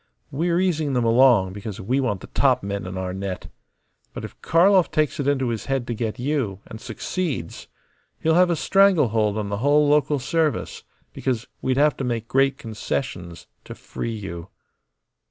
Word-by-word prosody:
We 160 Hz, +6 st, -1 dB
are 170 Hz, -, +2 dB
easing 160 Hz, -6 st, 0 dB
them 125 Hz, -2 st, +1 dB
along 115 Hz, -5 st, +4 dB
because 105 Hz, 0 st, -7 dB
we 125 Hz, +8 st, 0 dB
want 105 Hz, -8 st, -1 dB
the -, -, -10 dB
top -, -, +2 dB
men 100 Hz, -1 st, -4 dB
in 95 Hz, +1 st, -6 dB
our 95 Hz, -1 st, -3 dB
net. 95 Hz, -1 st, -5 dB, 0.7 s
But -, -, -5 dB
if -, -, -13 dB
Karlov 180 Hz, +2 st, +4 dB
takes 155 Hz, +1 st, 0 dB
it 140 Hz, -, -1 dB
into 135 Hz, -3 st, +1 dB
his 115 Hz, -2 st, -3 dB
head 135 Hz, -3 st, -1 dB
to 120 Hz, -, -3 dB
get 110 Hz, -1 st, -3 dB
you, 125 Hz, -7 st, -2 dB
and 110 Hz, -, -10 dB
succeeds, 135 Hz, -, -4 dB, 0.5 s
he'll 160 Hz, -, +2 dB
have 180 Hz, +1 st, +5 dB
a 170 Hz, -, +2 dB
stranglehold 145 Hz, -, +3 dB
on 105 Hz, -2 st, -3 dB
the 100 Hz, -, -2 dB
whole 145 Hz, +5 st, +3 dB
local 145 Hz, 0 st, +3 dB
service; 155 Hz, +3 st, -1 dB, 0.3 s
because 125 Hz, -3 st, -2 dB, 0.2 s
we'd 130 Hz, 0 st, 0 dB
have 145 Hz, -1 st, +4 dB
to -, -, -3 dB
make 115 Hz, -2 st, -2 dB
great 135 Hz, +1 st, +2 dB
concessions 105 Hz, -, -5 dB, 0.2 s
to -, -, -9 dB
free 115 Hz, -1 st, -5 dB
you." 90 Hz, -5 st, -7 dB
125 Hz, 180 wpm, -23 LUFS, 105-150 Hz, 0.7 s, have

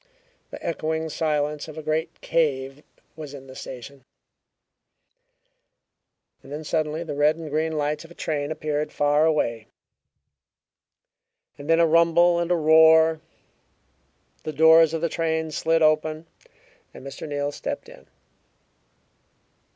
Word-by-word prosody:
The -, -, -9 dB
echoing 160 Hz, -1 st, -2 dB
silence 150 Hz, -1 st, -2 dB
of 155 Hz, 0 st, -10 dB
a 155 Hz, -, -6 dB
great 160 Hz, +2 st, -3 dB
cave 140 Hz, -4 st, -1 dB, 0.3 s
was 150 Hz, -2 st, -9 dB
in 135 Hz, -1 st, -11 dB
the 130 Hz, 0 st, -13 dB
station. 130 Hz, +2 st, -10 dB, 2.4 s
Then 150 Hz, +3 st, -7 dB
suddenly 155 Hz, +1 st, -2 dB
the 155 Hz, -3 st, -6 dB
red 145 Hz, +2 st, +2 dB
and 160 Hz, -2 st, -8 dB
green 160 Hz, +2 st, -1 dB
lights 150 Hz, 0 st, -2 dB
of 165 Hz, -, -14 dB
a 170 Hz, -, -15 dB
train 145 Hz, -1 st, -3 dB
appeared 150 Hz, -1 st, -3 dB
far 145 Hz, +1 st, +2 dB
away; 115 Hz, -8 st, -1 dB, 1.9 s
then 165 Hz, +3 st, +1 dB
a 170 Hz, -, +5 dB
rumble 170 Hz, +1 st, +4 dB
and 170 Hz, 0 st, -2 dB
a 175 Hz, -, +3 dB
roar, 160 Hz, 0 st, +5 dB, 1.2 s
the 155 Hz, -, -5 dB
doors 160 Hz, +1 st, +6 dB
of 160 Hz, -, -3 dB
the 170 Hz, -, +1 dB
train 160 Hz, -1 st, -2 dB
slid 165 Hz, +2 st, +1 dB
open 155 Hz, +1 st, +1 dB, 0.7 s
and -, -, -11 dB
Mr. 140 Hz, +3 st, -8 dB
Neal 145 Hz, 0 st, -2 dB
stepped -, -, -6 dB
in. 65 Hz, -, -15 dB
155 Hz, 130 wpm, -24 LUFS, 145-160 Hz, 2.4 s, doors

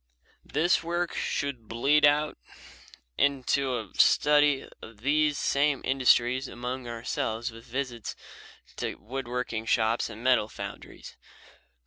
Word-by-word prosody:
This 170 Hz, +4 st, +1 dB
work 175 Hz, +1 st, -2 dB
should 130 Hz, -6 st, -3 dB
lead 145 Hz, +6 st, +4 dB
out 150 Hz, +1 st, +1 dB, 0.8 s
into 135 Hz, -1 st, +1 dB
a 110 Hz, -4 st, -7 dB
study 145 Hz, -2 st, +4 dB
of 110 Hz, -2 st, -12 dB
these 150 Hz, +2 st, +2 dB
same 140 Hz, -1 st, +1 dB
industries 130 Hz, 0 st, +3 dB
among 125 Hz, +1 st, -5 dB
ourselves 115 Hz, -1 st, -3 dB
with 115 Hz, +1 st, -13 dB
visits 125 Hz, -3 st, -4 dB, 0.6 s
to -, -, -3 dB
wood 130 Hz, +4 st, -6 dB
working 120 Hz, -2 st, -3 dB
shops 115 Hz, 0 st, +1 dB
and 110 Hz, -, -10 dB
metal 125 Hz, -4 st, +3 dB
foundries. -, -, -9 dB
130 Hz, 115 wpm, -28 LUFS, 115-145 Hz, 0.8 s, lead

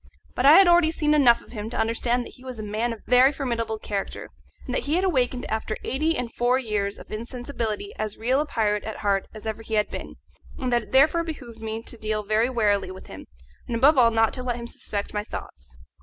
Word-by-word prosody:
But 255 Hz, -, +2 dB
I 290 Hz, -, +10 dB
had 385 Hz, +2 st, +8 dB
already 345 Hz, -2 st, +5 dB
seen 300 Hz, -2 st, +1 dB
enough 255 Hz, -6 st, +5 dB
of -, -, -17 dB
him 215 Hz, -2 st, -5 dB
to -, -, -5 dB
understand 235 Hz, +2 st, 0 dB
that -, -, -10 dB
he 255 Hz, -, -16 dB
was 255 Hz, -2 st, -7 dB
a 215 Hz, -, -5 dB
man 215 Hz, +3 st, -1 dB
of 225 Hz, -, -7 dB
a -, -, -19 dB
very 255 Hz, +2 st, +7 dB
formidable 235 Hz, -6 st, -2 dB
character, 205 Hz, -2 st, -5 dB, 0.4 s
and 255 Hz, -, -4 dB
that -, -, -1 dB
he 295 Hz, +3 st, +1 dB
had 365 Hz, -, +1 dB
awakened 255 Hz, -8 st, 0 dB
after 220 Hz, 0 st, -3 dB
eight 315 Hz, +5 st, 0 dB
and 240 Hz, -2 st, -4 dB
forty 250 Hz, +2 st, +1 dB
years 200 Hz, -1 st, -1 dB
of -, -, -13 dB
insensibility 230 Hz, -2 st, -4 dB
as 215 Hz, -1 st, -3 dB
real 255 Hz, +5 st, +1 dB
a 305 Hz, -, -3 dB
pirate 210 Hz, -6 st, 0 dB
at 220 Hz, -, -6 dB
heart 195 Hz, -1 st, +1 dB
as 215 Hz, 0 st, -11 dB
ever 220 Hz, 0 st, -4 dB
he 220 Hz, 0 st, -4 dB
had 210 Hz, 0 st, +2 dB
been, -, -, -7 dB, 0.4 s
and 255 Hz, -3 st, -2 dB
that 240 Hz, -, +3 dB
it -, -, -15 dB
therefore 310 Hz, +6 st, +4 dB
behoved 260 Hz, -9 st, -8 dB
me 220 Hz, 0 st, -4 dB
to 235 Hz, -, -8 dB
deal 215 Hz, 0 st, -2 dB
very 215 Hz, +4 st, +1 dB
warily 210 Hz, -6 st, +1 dB
with 185 Hz, 0 st, -10 dB
him, 95 Hz, -, -11 dB, 0.4 s
and 235 Hz, -, -2 dB
above 275 Hz, +7 st, +5 dB
all 245 Hz, -3 st, +6 dB
not 225 Hz, -1 st, +2 dB
to 255 Hz, -, -5 dB
let 250 Hz, -1 st, -2 dB
him 235 Hz, 0 st, -6 dB
suspect 205 Hz, -3 st, -5 dB
my 210 Hz, 0 st, -1 dB
thoughts. 65 Hz, -, -9 dB
235 Hz, 245 wpm, -25 LUFS, 215-260 Hz, 0.4 s, I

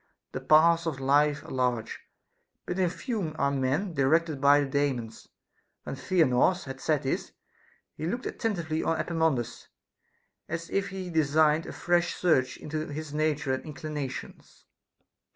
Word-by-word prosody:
The -, -, -5 dB
paths 165 Hz, +2 st, +5 dB
of 145 Hz, -5 st, -3 dB
life 145 Hz, +2 st, +2 dB
are -, -, -10 dB
large, 125 Hz, -3 st, -1 dB, 0.7 s
but 180 Hz, +2 st, -3 dB
in 180 Hz, -2 st, +3 dB
few 180 Hz, -2 st, -4 dB
are 140 Hz, -2 st, +1 dB
men 140 Hz, +8 st, 0 dB
directed 155 Hz, +1 st, +2 dB
by 145 Hz, +1 st, +6 dB
the -, -, 0 dB
Daemons. 135 Hz, -5 st, -2 dB, 0.6 s
When -, -, -5 dB
Theanor 160 Hz, -1 st, +3 dB
had 135 Hz, -1 st, -8 dB
said 150 Hz, -2 st, +1 dB
this, 135 Hz, -, -2 dB, 0.6 s
he 155 Hz, -, -5 dB
looked 240 Hz, +8 st, -3 dB
attentively 170 Hz, -8 st, -2 dB
on 165 Hz, -, 0 dB
Epaminondas, 160 Hz, -8 st, -1 dB, 0.8 s
as 170 Hz, 0 st, -5 dB
if 195 Hz, 0 st, 0 dB
he 190 Hz, -2 st, -6 dB
designed 155 Hz, 0 st, +3 dB
a -, -, -5 dB
fresh 175 Hz, 0 st, +1 dB
search 155 Hz, -8 st, +2 dB
into 155 Hz, +1 st, -4 dB
his 150 Hz, 0 st, -6 dB
nature 150 Hz, -3 st, 0 dB
and 130 Hz, -, -3 dB
inclinations. 150 Hz, -3 st, -7 dB
155 Hz, 145 wpm, -28 LUFS, 140-170 Hz, 0.8 s, by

